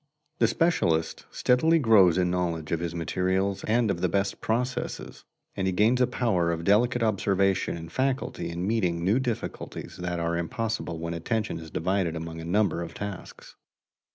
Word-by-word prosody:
The - - +5
specialist 85 - +1
steadily 160 +7 +3
grows 105 - +5
in 90 -1 +2
knowledge 85 -3 -2
of 85 - +1
his 85 0 -4
materials 95 +3 -1
and 115 -1 +2
of 85 -3 -3
the 90 - +2
best 100 +2 -1
processes, 125 +3 -3 0.3
and 95 -1 -1
he 95 - +1
gains 115 +7 +3
a 125 - +4
power 90 -9 +1
of 85 0 -3
delicate 115 +6 +3
observation 100 -4 +1
and 80 0 -9
facility 130 -1 -1
in 85 +2 -3
meeting 90 -6 0
new 105 +7 +3
difficulties 125 -4 -5
that 90 -1 -3
are 85 0 -1
impossible 110 -1 -3
when 85 +1 -4
attention 105 +6 -2
is 80 -1 -9
divided 90 +1 -1
among 80 0 -6
a - - -7
number 90 -1 +1
of 85 -1 -7
tasks. 100 -3 -8
95 Hz, 170 wpm, -27 LUFS, 85-110 Hz, 0.3 s, The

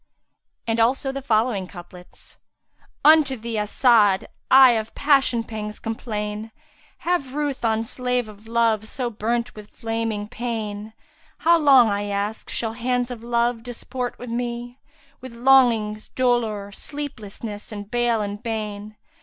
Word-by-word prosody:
And 225 0 0
also 265 +4 +2
the 275 0 -5
following 220 -5 +1
couplets, 180 -1 -13 0.7
"Unto 300 -4 +6
thee, 225 -1 -3
As'ad! 210 -2 +3 0.2
I 265 -1 +8
of 220 -1 -2
passion 275 -5 +3
pangs 210 -2 -6
complain; 215 -1 -4 0.2
* - - -31
Have 280 -7 0
ruth 290 -4 -2
on 225 -1 +1
slave 250 0 -2
of 215 +1 -14
love 225 -2 +1
so 245 0 -3
burnt 235 +3 -2
with 210 0 -12
flaming 225 -2 -3
pain: 220 -2 -5 0.4
How 335 +1 +4
long, 270 -6 +6
I 205 0 -1
ask, 205 +2 -3
shall 225 -1 -2
hands 245 +1 -1
of 240 -2 -7
Love 235 0 0
disport 245 +1 -5
with 245 -1 -8
me, 240 +1 -4 0.2
* - - -32
With 260 -1 -9
longings, 235 -4 +3
dolour, 225 -5 0
sleepliness 220 -5 -6
and 205 -1 -8
bale 240 -2 +1
and 205 0 -5
bane? 215 -2 -5
230 Hz, 140 wpm, -23 LUFS, 215-250 Hz, 0.7 s, I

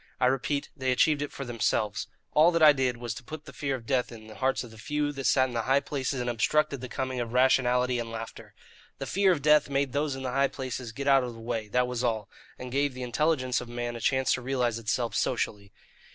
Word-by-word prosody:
I 125 - +3
repeat, 135 +2 0
they 130 -3 -1
achieved 145 +3 +3
it 145 - -3
for 140 - -6
themselves. 115 -3 -1 0.3
All 155 +3 +6
that 165 -1 +3
I 150 -1 +9
did 130 -3 0
was 120 -1 -4
to 120 - -10
put 155 +3 -8
the 140 - -11
fear 140 -2 -2
of 120 -3 -9
death 125 0 0
in 110 -2 -11
the 110 - -11
hearts 130 +3 0
of 120 - -11
the 110 - -14
few 145 +4 -1
that 135 -2 -6
sat 130 -1 +4
in 125 - -8
the 115 - 0
high 135 +4 +3
places 140 -1 -3
and 125 - -2
obstructed 140 +4 +1
the 130 - -6
coming 130 0 -3
of 120 -1 -4
rationality 125 -1 +3
and 115 -1 -4
laughter. 115 0 -8 0.4
The - - -5
fear 195 0 +3
of 150 -6 -1
death 150 -1 +5
made 140 -2 0
those 145 -1 0
in 135 - -7
the 130 - -2
high 135 +2 +3
places 130 -3 -5
get 140 +4 -5
out 135 -1 +5
of 120 -2 -5
the - - -11
way, 115 -1 -3
that 125 +4 +2
was 125 0 -3
all, 110 -4 -1 0.3
and 125 0 -7
gave 140 0 0
the 130 - -5
intelligence 130 0 +1
of 120 - -9
man 120 0 -4
a 115 - -7
chance 130 +1 +2
to 125 - -2
realize 125 -3 0
itself 115 0 -1
socially. 100 -1 -1
130 Hz, 255 wpm, -28 LUFS, 120-140 Hz, 0.4 s, I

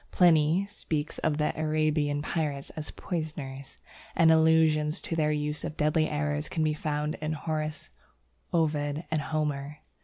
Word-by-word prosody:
Pliny 170 +1 +4
speaks 160 -7 -4
of 150 - 0
the 150 0 +1
Arabian 155 -2 +1
pirates 150 -4 -2
as 155 -1 -6
poisoners, 145 -5 -5 0.4
and 165 -1 +6
allusions 160 -1 +4
to 165 - -3
their 155 -2 +2
use 150 0 -2
of 155 - -5
deadly 155 +1 +2
arrows 150 0 -1
can 160 - -1
be 155 -1 +2
found 150 0 -2
in 155 0 -1
Horace, 155 0 -4 0.6
Ovid, 150 -1 0
and 155 -1 +1
Homer. 150 -1 -2
155 Hz, 145 wpm, -28 LUFS, 150-160 Hz, 0.6 s, and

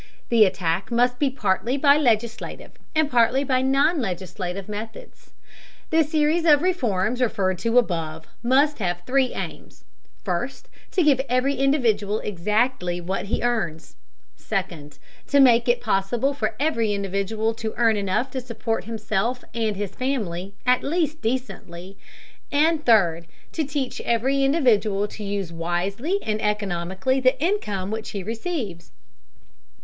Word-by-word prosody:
The 230 -3 +6
attack 185 -1 -1
must 245 +1 +2
be 285 - +2
partly 235 +1 0
by 280 0 +5
legislative, 235 -4 -1 0.2
and 310 -1 +3
partly 245 +1 +3
by 255 -2 +1
non 275 +4 +2
legislative 185 -1 -4
methods. 215 +2 -8 0.6
The 320 0 +5
series 310 +2 +1
of 300 -2 +5
reforms 245 - 0
referred 190 -6 0
to 230 +1 +1
above 165 -8 0 0.2
must 275 +5 +3
have 175 -3 -2
three 260 -1 +1
aims: - - -7 0.4
first, - - -3 0.2
to 365 - +3
give 280 -4 +4
every 255 +3 +2
individual 230 -8 +1
exactly 210 -1 0
what 185 +2 -3
he 205 - -2
earns; 175 -11 -2 0.4
second, 145 -3 -4 0.3
to 285 - +3
make 240 -3 +5
it 240 - +2
possible 230 +5 0
for 280 - -2
every 230 -8 +1
individual 200 +3 -1
to 220 -1 -5
earn 230 -2 +4
enough 205 +6 -1
to 260 - -3
support 230 -2 -3
himself 225 +2 -2
and 220 -3 -1
his 200 -1 -4
family 200 -8 -3
at 250 0 +3
least 315 0 -1
decently; 200 -7 -4 0.6
and 305 +1 +2
third, 170 -7 +4 0.2
to 320 - -1
teach 280 -2 -3
every 265 +4 +1
individual 220 -8 +2
to 215 - -8
use 200 -4 -3
wisely 185 - -1
and 215 0 -2
economically 200 +3 -1
the 255 0 +2
income 215 - -1
which 220 0 -4
he 200 -3 -5
receives. 225 - -4
225 Hz, 140 wpm, -23 LUFS, 195-265 Hz, 0.6 s, The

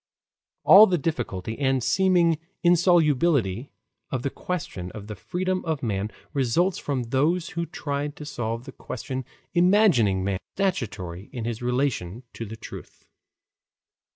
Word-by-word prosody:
All 210 +3 +9
the 180 - +2
difficulty 120 - -3
and 135 -3 +1
seeming 175 -3 +3 0.2
insolubility 155 - +3 0.4
of 130 -2 -3
the 140 - -1
question 95 - -5
of 105 -2 -8
the 105 - -6
freedom 185 - -2
of 160 -5 -2
man 105 -2 -1 0.2
results 155 +7 +1
from 135 -4 -2
those 150 +9 +1
who 170 0 -3
tried 145 0 -3
to 150 - -9
solve 115 -4 -3
the - - -8
question 130 +1 -6 0.3
imagining 175 - +4
man 95 -1 -1 0.2
as 195 -1 +3
stationary 95 - -6
in 120 -3 -5
his 115 -1 -3
relation 125 -5 -1
to 115 - -6
the 110 +2 -8
truth. - - -11
135 Hz, 140 wpm, -25 LUFS, 115-170 Hz, 0.4 s, All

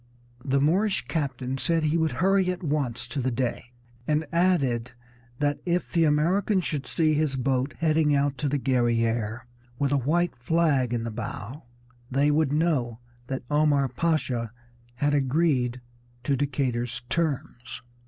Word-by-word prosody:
The 140 0 +1
Moorish 190 +8 +1
captain 135 -4 -2
said 165 +1 +1
he 155 +1 +1
would 160 -1 +1
hurry 190 0 +2
at 180 0 -3
once 140 -7 -1
to 125 +3 -3
the 130 - 0
Dey, 120 -1 -2 0.4
and 155 +1 +1
added 140 -10 +1 0.4
that 145 +1 0
if 175 0 -1
the 165 -2 +3
Americans 180 +6 +2
should 145 -3 -3
see 155 -2 +2
his 150 -2 +1
boat 130 +2 0
heading 155 -2 +2
out 140 0 +1
to 145 - 0
the 145 - 0
Guerrière 120 -3 0 0.4
with 140 +1 0
a 145 - +3
white 165 +6 +1
flag 140 -1 +1
in 120 -2 -1
the 115 - -4
bow 115 +4 -6 0.4
they 140 +3 +2
would 150 -2 +2
know 145 -7 0 0.3
that 130 -1 -4
Omar 145 -2 +3
Pasha 130 -9 -1 0.5
had 145 +3 +1
agreed 135 -3 +1 0.4
to 140 +2 +1
Decatur's 125 -4 -2
terms. 135 -7 -3
140 Hz, 150 wpm, -26 LUFS, 125-160 Hz, 0.5 s, the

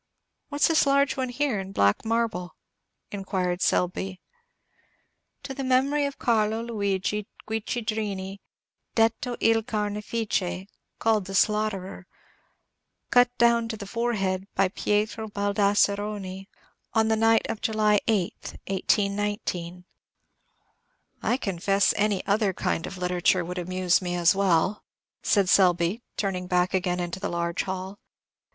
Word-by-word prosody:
"What's 290 +1 +2
this 320 -3 +3
large 280 0 +3
one 260 -1 -2
here, 245 -3 0
in 195 0 -7
black 100 - +2
marble?" 225 -6 -1 0.6
inquired 190 -2 -2
Selby. 185 +1 0 1.2
"To 280 -1 -5
the 270 0 -5
memory 275 +3 +2
of 280 - -7
Carlo 220 -1 +1
Luigi 205 -2 -2 0.2
Guiccidrini, 215 -3 -3 0.6
'detto 230 +2 +1
il 225 0 +3
Carnefice,' 210 -3 -2 0.3
called 220 -3 +1
'the 195 0 -6
slaughterer:' 195 -3 0 1.0
cut 245 0 +6
down 235 -1 +4
to 220 -1 -5
the 205 - -7
forehead 200 -4 -1
by 190 - +3
Pietro 215 +3 -1
Baldasseroni, 200 -1 0 0.5
on 220 0 +4
the 220 - +3
night 225 0 +3
of 225 -1 -4
July 215 -2 +2
8th, 205 -6 -1
1819." 195 -3 -1 1.4
"I 245 - +1
confess 195 -2 +1
any 205 -2 0
other 200 -1 +1
kind 165 - -2
of 195 - -8
literature 180 0 +1
would 180 +1 -4
amuse 185 +1 +1
me 175 -1 -2
as 175 -1 +4
well," 190 0 +1 0.4
said 200 -3 +2
Selby, 180 +2 +3 0.2
turning 185 -3 -2
back 180 0 +1
again 180 -1 0
into 175 +1 -3
the - - -3
large 170 +1 -1
hall. 190 +1 -5
200 Hz, 125 wpm, -26 LUFS, 185-225 Hz, 1.4 s, cut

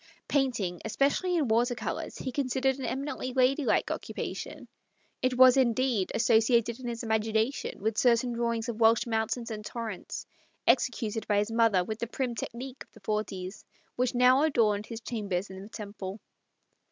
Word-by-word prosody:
Painting, 230 - 0
especially 280 - +1
in 310 -6 +1
water 240 +2 +2
colours, - - -4
he 260 - -4
considered 265 0 0
an 260 - -3
eminently 260 0 -3
ladylike 265 +2 +2
occupation; - - -5 0.5
it 255 -1 +1
was, 255 -1 +8
indeed, 245 -5 +2
associated 230 +1 +3
in 255 - -6
his 235 0 -4
imagination 220 +2 0
with 215 +1 -1
certain 240 0 +3
drawings 235 -1 -1
of 235 -2 -4
Welsh 225 0 +5
mountains 230 +1 -1
and 215 -1 -5
torrents, 220 -3 -6 0.4
executed 225 -4 +1
by 205 - +2
his 205 +2 +1
mother 225 -5 +3
with 215 +4 -5
the 235 - -2
prim 250 +1 -2
technique 250 +4 -6
of - - -31
the - - -15
forties, 195 -2 -3 0.3
which 250 0 0
now 250 +2 +5
ndorned 210 -6 +1
his 230 -1 -7
chambers 200 -5 -3
in 190 0 -8
the 200 - -10
Temple. 205 -2 -7
230 Hz, 160 wpm, -29 LUFS, 215-255 Hz, 0.5 s, was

